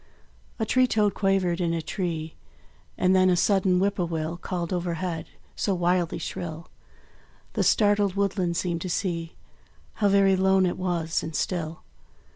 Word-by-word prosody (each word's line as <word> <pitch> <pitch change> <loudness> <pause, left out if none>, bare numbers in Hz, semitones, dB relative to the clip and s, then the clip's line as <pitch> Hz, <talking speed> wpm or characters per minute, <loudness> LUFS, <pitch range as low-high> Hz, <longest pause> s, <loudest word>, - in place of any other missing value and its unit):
A 220 - -1
tree 255 +3 +3
toad 210 -3 +2
quavered 190 -3 +1
in 170 -1 0
a - - -1
tree; 165 -3 -3 0.6
And 185 +1 +3
then 185 0 +5
a 180 - +4
sudden 190 -1 +3
whip 200 +1 +1
poor 175 -3 0
will 165 0 -3
Called 175 0 -4
overhead, 170 -1 -3 0.3
so 195 - 0
wildly 175 -1 +1
shrill, 170 -2 -6 0.8
The - - 0
startled 205 -2 +3
woodland 190 -4 0
seemed 170 -2 -1
to 185 - -4
see 170 -2 -2 0.7
How 205 - +5
very 195 -1 +4
lone 190 0 +3
it 180 - -2
was 170 -3 -1
and 160 -1 -6
still. 165 -2 -3
180 Hz, 155 wpm, -26 LUFS, 170-195 Hz, 0.8 s, then